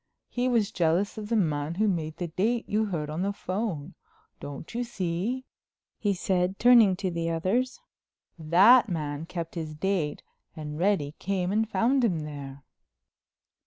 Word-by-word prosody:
He 245 +1 -1
was 230 -3 +2
jealous 180 +3 +1
of 210 -1 -7
the 235 - +1
man 155 -5 0
who 215 +4 +2
made 160 -5 -2
the 175 -2 -3
date 225 +8 0
you 215 +1 +1
heard 165 -7 -3
on 155 +3 -3
the 200 +1 0
phone. 185 -5 -4 0.5
Don't 145 - -8
you 240 +1 -1
see," 225 +3 -3 0.5
he 205 - +1
said, 185 0 0
turning 235 -5 +6
to 190 -1 -2
the 165 -1 -2
others, 205 - 0 0.6
"that 195 +10 +6
man 155 -2 -3
kept 170 -2 -5
his 155 -3 -5
date 160 -3 -1 0.3
and 150 -1 -6
Reddy 175 -6 +1
came 185 -1 -1
and 220 +1 +1
found 255 +4 +2
him 175 -9 +1
there." 140 -2 -8
185 Hz, 160 wpm, -27 LUFS, 160-215 Hz, 0.6 s, turning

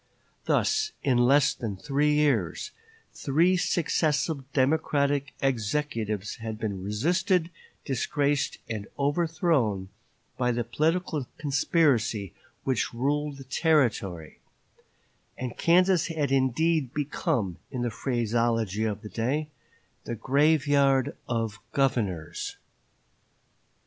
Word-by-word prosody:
Thus, 435 0 +1
in 130 -3 +3
less 135 +3 +4
than 110 -6 -5
three 145 +6 +1
years, 130 - +1 0.4
three 165 +7 +2
successive 155 -5 0
Democratic 140 0 +1
executives 115 -5 -1
had 110 -1 -5
been 100 -4 -4
resisted, 170 - +1 0.3
disgraced, 140 +1 0
and 110 -2 -5
overthrown 145 - +1 0.5
by 125 -1 +2
the 120 0 -1
political 155 +3 -1
conspiracy 140 - +1 0.3
which 130 -3 -1
ruled 145 +3 -1
the 135 - -9
Territory; 120 - 0 1.0
and 125 -2 -5
Kansas 180 0 +3
had 155 -4 -1
indeed 135 +2 +1
become, 140 - -1
in 125 -2 -3
the 120 - -1
phraseology 115 -3 0
of 105 0 -3
the 105 - -7
day, 140 +8 -1 0.6
"the 120 - -3
graveyard 140 +1 +3
of 115 -3 -2
governors." 95 - -1
135 Hz, 100 wpm, -27 LUFS, 115-150 Hz, 1.0 s, less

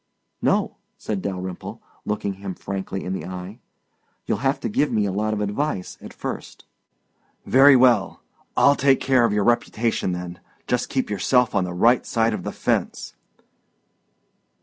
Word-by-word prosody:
"No," - - +1 0.2
said 105 -3 -4
Dalyrimple, 95 -2 -5 0.3
looking 105 -1 -2
him 95 -2 -5
frankly 95 0 -5
in 95 - -3
the 95 - -4
eye. 95 +4 -8 0.7
"You'll 100 - -1
have 135 +3 0
to - - -2
give 145 +7 0
me 105 -1 +1
a 100 - -1
lot 105 +3 -1
of 105 -1 -2
advice 105 -1 -3
at - - -10
first." - - -7 0.8
"Very 135 +2 +7
well. 120 -6 +3 0.3
I'll 140 - +6
take 135 -1 +3
care 130 -3 +3
of 115 - +1
your 105 0 +1
reputation 115 -3 0
then. 90 0 -6 0.3
Just 125 0 -1
keep 130 -5 -1
yourself 120 +5 +2
on 95 - +1
the 90 - -5
right 120 +7 +4
side 115 -1 +1
of - - -3
the - - -4
fence." - - -2
105 Hz, 160 wpm, -23 LUFS, 95-125 Hz, 0.8 s, Very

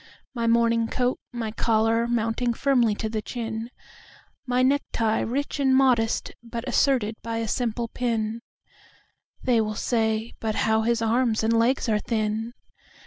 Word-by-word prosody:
My 235 -2 -1
morning 230 0 +3
coat, 250 +2 -1
my 230 -3 -4
collar 225 +1 +1
mounting 235 +1 0
firmly 245 -6 +2
to 220 - -3
the 215 0 -3
chin, 225 0 -5 0.8
My 250 +1 +2
necktie 255 -5 +1
rich 280 +5 -2
and 265 -2 +3
modest, 250 -4 +2
but 235 +1 -6
asserted 245 -4 +2
by 230 0 -4
a 225 0 -2
simple 235 +1 -1
pin—(They 230 +1 -4
will 215 -1 -2
say: 220 0 0
"But 220 -1 -2
how 220 0 +3
his 230 0 +1
arms 225 -1 +1
and 225 +1 +2
legs 235 +4 +2
are 215 -2 +2
thin!") 220 +2 -2
230 Hz, 140 wpm, -25 LUFS, 220-245 Hz, 0.8 s, morning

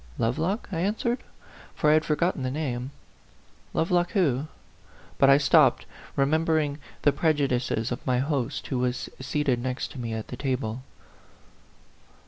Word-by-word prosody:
"Lovelock?" 160 - -1
I 165 - -2
answered, 225 +6 0 0.6
for 150 - +3
I - - +6
had 155 0 +4
forgot 170 +4 +1
ten - - -7
the 130 - -1
name. 130 -3 -3 0.8
"Lovelock, 175 +3 +1
who 150 - +1 0.3
" - - -25
But 135 - +6
I 135 - +8
stopped, 145 - +4 0.3
remembering 155 0 +1 0.2
the 145 - +5
prejudices 135 -6 0
of 125 - -4
my 125 -1 +1
host, 135 -2 -1
who 130 - -2
was 125 0 -1
seated 130 -2 0
next 130 +1 -3
to 135 - -9
me 115 -2 -3
at 110 - -5
table. 130 -2 -3
140 Hz, 145 wpm, -26 LUFS, 125-160 Hz, 0.8 s, I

